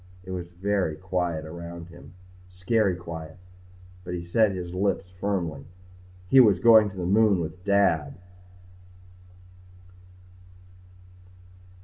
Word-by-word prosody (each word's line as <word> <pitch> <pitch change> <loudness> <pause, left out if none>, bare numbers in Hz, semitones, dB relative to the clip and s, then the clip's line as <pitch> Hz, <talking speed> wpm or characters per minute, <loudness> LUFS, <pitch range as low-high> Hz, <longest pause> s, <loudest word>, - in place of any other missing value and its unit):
It 95 - -9
was 90 -2 -5
very 90 -2 -2
quiet 90 -3 -3
around 85 +1 -9
him. 85 +1 -15 0.3
Scary 95 +2 0
quiet. 80 -2 -9 0.7
But 90 0 -5
he 85 -1 -6
set 110 +4 +2
his 90 -2 -6
lips 95 0 -1
firmly. 85 -8 -3 0.6
He 135 - +6
was 105 -7 +6
going 110 +1 +6
to 95 - -13
the 90 - -3
moon 100 0 +3
with 85 +2 -6
Dad. 100 -6 +1
90 Hz, 110 wpm, -25 LUFS, 85-100 Hz, 0.7 s, He